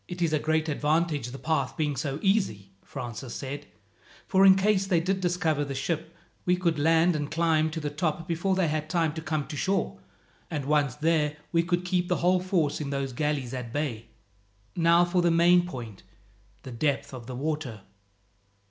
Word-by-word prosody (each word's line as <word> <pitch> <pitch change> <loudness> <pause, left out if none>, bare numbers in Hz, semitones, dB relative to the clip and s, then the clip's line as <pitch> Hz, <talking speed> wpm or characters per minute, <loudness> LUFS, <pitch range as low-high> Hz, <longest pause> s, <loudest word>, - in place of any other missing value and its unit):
"It 180 0 -7
is 165 -3 +1
a 155 - +3
great 160 +1 0
advantage, 150 -2 0
the 125 +2 -7
path 145 -3 -1
being 150 -2 0
so 135 +1 -2
easy," 150 - +1
Francis 120 -2 -7
said, 145 +2 -6 0.6
"for 195 +1 +5
in 190 - +8
case 195 0 +2
they 180 -4 +3
did 190 +3 -1
discover 170 -4 +1
the 140 -1 -5
ship 160 +4 -3 0.3
we 180 - +3
could 170 -4 0
land 165 +3 +4
and 150 -1 -2
climb 160 -1 +2
to 160 +1 -4
the 150 -2 -3
top 155 +1 -2
before 175 +3 0
they 185 -3 +2
had 155 0 -2
time 165 -3 +1
to 160 - -5
come 155 -2 -2
to 155 - -7
shore, 195 +7 -1 0.5
and 150 -5 -3
once 145 -3 +2
there 150 -1 +1
we 165 - +3
could 175 +1 -1
keep 180 0 0
the 180 - +1
whole 180 +1 +4
force 175 -6 0
in 145 - -3
those 140 -2 -2
galleys 140 -2 -1
at 125 -3 -5
bay. 125 -5 -3 0.7
Now 170 0 +5
for 175 +1 +1
the 175 - +3
main 175 +1 +4
point, 120 - -8 0.6
the 130 - -8
depth 135 +3 -1
of 120 -3 -8
the 130 - -6
water." 140 -5 -3
155 Hz, 190 wpm, -27 LUFS, 140-175 Hz, 0.7 s, in